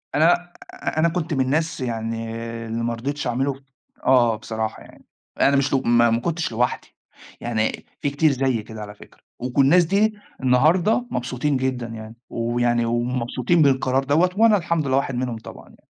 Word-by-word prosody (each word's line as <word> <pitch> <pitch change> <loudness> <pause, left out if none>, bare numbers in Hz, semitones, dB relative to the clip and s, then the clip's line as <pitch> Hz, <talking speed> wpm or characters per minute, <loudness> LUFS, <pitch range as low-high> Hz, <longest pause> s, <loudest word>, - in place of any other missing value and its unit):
أنا 160 +4 +5 0.4
أ - - -4
أنا 165 +1 +4
كنت 165 -2 -3
من 135 - +1
الناس 160 +5 -1
يعني 115 -1 -3 0.3
اللي 115 +1 -3
ما 120 0 -1
رضيتش 140 +5 -4
أعمله، 135 +3 0 0.5
آه، 120 -3 +5
آه - - -2
بصراحة 110 0 -4
يعني، - - -18 0.4
أنا 140 - +5
مش 135 0 +1
لؤ 135 - +3
ما 120 0 +5
ما 115 0 +1
كنتش 165 +3 -2
لوحدي، 120 +2 -1 0.5
يعني 110 -2 -2 0.2
في 145 - +1
كتير 145 +2 +2
زيي 130 -4 0
كده 110 0 -9
على 105 0 -8
فكرة، - - -17 0.2
وك 125 +2 -3
الناس 165 +6 +5
دي 205 +5 +2 0.3
النهاردة 165 - +3
مبسوطين 125 +3 -1
جدًا 130 -2 -2
يعني، 110 -1 -9
ويعني 120 0 0
ومبسوطين 125 +6 0
بالقرار 135 -2 +2
دَوَّة، 155 +7 +3
وأنا 220 -1 +5
الحمد 170 -4 -1
لله 130 0 +2
واحد 135 -1 -1
منهم 125 -2 -2
طبعًا 110 - -12
يعني. - - -22
130 Hz, 175 wpm, -22 LUFS, 115-150 Hz, 0.5 s, أنا